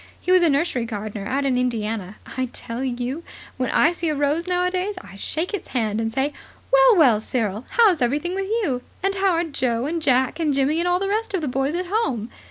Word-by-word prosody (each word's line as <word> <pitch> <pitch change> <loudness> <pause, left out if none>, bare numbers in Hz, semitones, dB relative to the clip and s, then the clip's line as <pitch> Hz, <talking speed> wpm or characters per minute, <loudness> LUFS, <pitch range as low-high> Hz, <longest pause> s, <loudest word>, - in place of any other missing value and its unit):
He 360 - -1
was 370 -1 +6
a 340 - +4
nursery 280 -4 +1
gardener 210 -2 -5
out 275 +3 0
in 255 -2 +2
Indiana. 220 -5 -2 0.2
I 260 -1 -1
tell 235 +2 -5
you, 255 +4 -3 0.4
when 255 -2 -1
I 320 - +4
see 340 -1 -2
a 305 - 0
rose 290 +4 0
nowadays, 365 +2 0
I 195 - -12
shake 320 - -3
its 410 - -4
hand 220 -3 -1
and 225 0 -1
say: 270 +5 0 0.4
'Well, - - +7
well, 260 - +5
Cyril, 220 -1 -2
how's 410 - +4
everything 290 +9 0
with 390 0 -2
you? 400 - 0 0.2
And 390 0 +2
how 390 -1 +2
are 335 +1 +1
Joe 255 -6 -1
and 330 +3 -2
Jack 260 0 +2
and 300 -4 +1
Jimmy 280 +4 +2
and 345 - 0
all 355 0 +3
the 390 +1 -2
rest 425 0 -1
of 365 - -1
the 305 - -2
boys 270 +4 -1
at 365 +1 -2
home?' 265 - -1
285 Hz, 225 wpm, -23 LUFS, 245-360 Hz, 0.4 s, Well